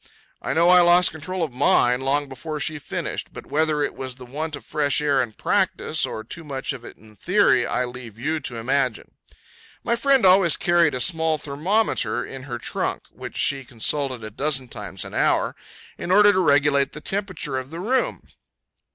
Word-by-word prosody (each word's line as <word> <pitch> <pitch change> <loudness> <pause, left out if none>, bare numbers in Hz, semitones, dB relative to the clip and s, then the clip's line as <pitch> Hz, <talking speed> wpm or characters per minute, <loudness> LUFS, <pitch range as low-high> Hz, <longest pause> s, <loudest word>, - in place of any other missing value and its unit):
I - - -2
know 170 +2 +4
I 180 0 +7
lost 175 +1 +5
all - - -12
control 170 +4 -4
of 150 -6 -3
mine 125 -1 +3
long 140 +2 +1
before 150 +4 -6
she 150 +2 -2
finished; - - -5
but - - -10
whether 150 0 +1
it - - -2
was 130 -1 -6
the 125 -1 -11
want 150 +5 -4
of 145 - -12
fresh 145 -1 +1
air 145 -3 +2
in 120 -3 -4
practice, 185 - 0
or 110 - -6
too 165 +9 -7
much 140 -2 -4
of 130 -3 -9
it - - -11
in 110 0 -18
theory, - - +2
I 125 - 0
leave 120 -3 -10
you 155 +6 -2
to 135 -4 -6
imagine. 130 0 -1 0.7
My 235 - +1
friend 270 -1 +3
always 185 -3 +5
carried 170 -5 +3
a - - -2
small 160 -1 +2
thermometer 160 +10 -1
in 135 0 -9
her 120 -3 -5
trunk, 115 - -3
which - - -9
she 135 -1 +1
consulted 130 +1 -1
a 110 - -7
dozen 135 +1 -1
times 95 -5 -7
an - - -10
hour, - - +1 0.4
in - - -5
order 205 +2 +6
to 190 - +1
regulate 145 -4 +3
the 150 - -8
temperature 185 -8 -2
of 130 0 -8
the 165 +2 -7
room. 250 +8 -1
145 Hz, 195 wpm, -23 LUFS, 130-170 Hz, 0.7 s, I